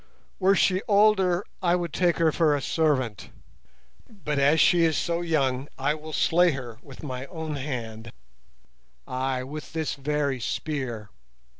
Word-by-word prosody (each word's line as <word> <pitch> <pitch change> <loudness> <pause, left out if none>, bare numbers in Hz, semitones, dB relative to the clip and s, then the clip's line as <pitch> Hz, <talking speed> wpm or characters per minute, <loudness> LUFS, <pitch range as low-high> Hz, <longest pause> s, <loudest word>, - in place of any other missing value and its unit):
Were 195 +1 +4
she 185 0 +2
older 200 -3 +3 0.2
I 175 -1 +3
would 175 -3 -3
take 175 -2 +2
her 165 -1 +3
for 155 -2 +2
a 145 - -2
servant; 130 - 0 0.8
but 150 -9 -3
as 145 +3 +4
she 170 +1 +5
is 160 -2 +2
so 170 0 -1
young 140 -5 0
I 135 +2 +1
will 155 +1 -8
slay 175 +2 +3
her 120 -4 -7
with 135 +1 -13
my 130 -2 -5
own 160 -2 -5
hand—ay, 115 - -7
with 150 +5 -8
this 160 -2 -2
very 140 -1 -1
spear. 120 -5 -4
150 Hz, 145 wpm, -26 LUFS, 130-170 Hz, 0.8 s, she